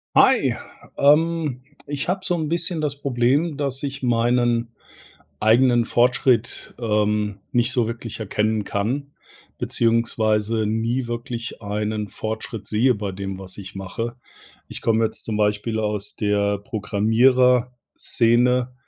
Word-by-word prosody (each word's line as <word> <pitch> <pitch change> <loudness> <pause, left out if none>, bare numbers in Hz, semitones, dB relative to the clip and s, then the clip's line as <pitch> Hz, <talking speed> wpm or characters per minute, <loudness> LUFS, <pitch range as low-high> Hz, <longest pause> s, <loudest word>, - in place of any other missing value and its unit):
Hi, - - +5 0.4
ähm, 150 -2 +3 0.2
ich 145 +2 -3
habe 190 +1 0
so 180 - 0
'n 160 -3 -2
bisschen 170 0 -1
das 145 -2 -2
Problem, 140 +4 +1
dass 140 -2 -3
ich 140 -1 -4
meinen 120 -1 +1 0.7
eigenen 120 +2 +4
Fortschritt, 120 0 +1
ähm, 105 -2 0
nicht 120 0 +2
so 120 -2 +1
wirklich 115 0 -6
erkennen 110 0 0
kann, 125 +9 -2 0.5
beziehungsweise 110 -1 +1
nie 115 +4 -1
wirklich 120 -1 -5
einen 105 0 -3
Fortschritt 110 -1 -5
sehe 115 +5 +2
bei 100 -1 -4
dem, 95 0 -5
was 95 -1 -9
ich 100 +1 -10
mache. 115 +5 -5 0.5
Ich - - -8
komme 115 0 +2
jetzt - - -6
zum 110 -2 -2
Beispiel 105 +2 0
aus 105 -1 -2
der 100 -1 +1
Programmierer-Szene 120 +3 +2
115 Hz, 125 wpm, -22 LUFS, 105-125 Hz, 0.7 s, Hi